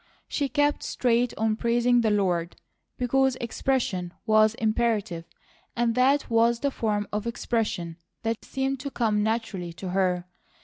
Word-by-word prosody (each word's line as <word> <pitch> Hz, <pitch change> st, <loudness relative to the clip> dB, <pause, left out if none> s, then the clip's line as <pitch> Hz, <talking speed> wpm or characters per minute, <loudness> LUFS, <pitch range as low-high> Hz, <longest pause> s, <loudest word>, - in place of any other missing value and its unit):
She 285 Hz, -2 st, -1 dB
kept 290 Hz, +2 st, +1 dB
straight 240 Hz, -1 st, +1 dB
on 220 Hz, 0 st, +1 dB
praising 240 Hz, +1 st, +3 dB
the 225 Hz, -, +2 dB
Lord, 180 Hz, -5 st, 0 dB, 0.4 s
because 265 Hz, +1 st, +2 dB
expression 230 Hz, -7 st, -2 dB
was 215 Hz, 0 st, +4 dB
imperative, 220 Hz, -7 st, 0 dB, 0.5 s
and 235 Hz, -1 st, +1 dB
that 265 Hz, +4 st, +3 dB
was 230 Hz, 0 st, +3 dB
the 280 Hz, -, +1 dB
form 210 Hz, -4 st, -1 dB
of 210 Hz, +2 st, -2 dB
expression 215 Hz, -8 st, -2 dB, 0.3 s
that 225 Hz, 0 st, -2 dB
seemed 270 Hz, 0 st, -2 dB
to 280 Hz, +2 st, -4 dB
come 220 Hz, -5 st, +1 dB
naturally 210 Hz, -6 st, -2 dB
to 180 Hz, +2 st, -6 dB
her. 180 Hz, -1 st, +1 dB
225 Hz, 140 wpm, -26 LUFS, 205-245 Hz, 0.5 s, was